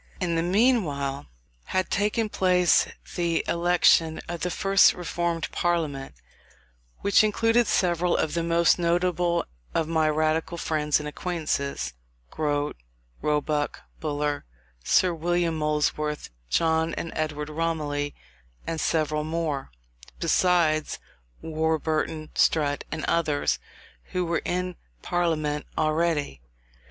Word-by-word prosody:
In 175 -3 0
the 165 - +1
meanwhile 175 - +1 0.4
had 185 0 -1
taken 210 +3 +1
place 180 -4 +3 0.3
the 170 -2 0
election 170 -2 +3
of 170 0 -4
the 180 - 0
first 195 +3 +4
Reformed 170 -1 -2
Parliament, 155 - -1 0.9
which 200 +1 +5
included 225 +2 +3
several 175 -1 +2
of 160 - 0
the 170 - 0
most 170 +1 +3
notable 175 0 +1 0.3
of 160 - +1
my 160 -1 +2
Radical 155 +2 0
friends 150 -3 +1
and 150 - -5
acquaintances 150 - -2 0.4
Grote, 145 - -1 0.4
Roebuck, 150 0 -1 0.2
Buller, 150 -1 -2 0.4
Sir 180 - +3
William 170 0 0
Molesworth, 150 - -1 0.2
John 160 - +1
and 165 - -5
Edward 150 -1 -2
Romilly, 150 -3 -2 0.5
and 165 -1 -3
several 155 -2 0
more; 155 - -2 0.5
besides 170 -2 +2 0.5
Warburton, 160 0 -1
Strutt, 145 -3 +2
and 155 0 -3
others, 155 -4 +1 0.5
who 180 -1 0
were 170 -1 0
in 180 0 -2 0.3
parliament 155 -4 -1
already. 155 - 0
160 Hz, 110 wpm, -26 LUFS, 150-175 Hz, 0.9 s, which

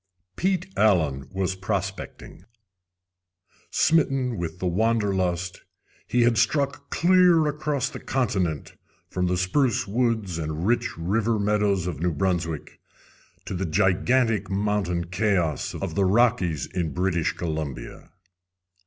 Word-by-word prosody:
Pete 185 0 0
Allen 80 -11 +2
was 95 0 -1
prospecting. 95 +1 -5 1.3
Smitten 135 -6 +2
with 85 0 -4
the 95 - -4
wanderlust, 95 -3 0 0.5
he 120 -1 +2
had 115 -1 +3
struck 140 +3 0
clear 180 -2 +4
across 150 -2 -1
the - - -7
continent 95 - -1 0.4
from 90 0 0
the 90 0 0
spruce 105 +4 +1
woods 110 -5 0
and 80 +2 -3
rich 120 -1 0
river 105 +7 0
meadows 100 -3 +1
of 85 -6 -4
New 85 0 0
Brunswick 85 -2 -2 0.7
to - - -5
the 95 0 -2
gigantic 100 +5 +2
mountain 95 -3 0
chaos 90 - 0
of - - -4
the 100 -1 +2
Rockies 95 - +2
in 85 -4 -3
British 90 -3 0
Columbia. 80 -4 -5
95 Hz, 120 wpm, -25 LUFS, 90-120 Hz, 1.3 s, clear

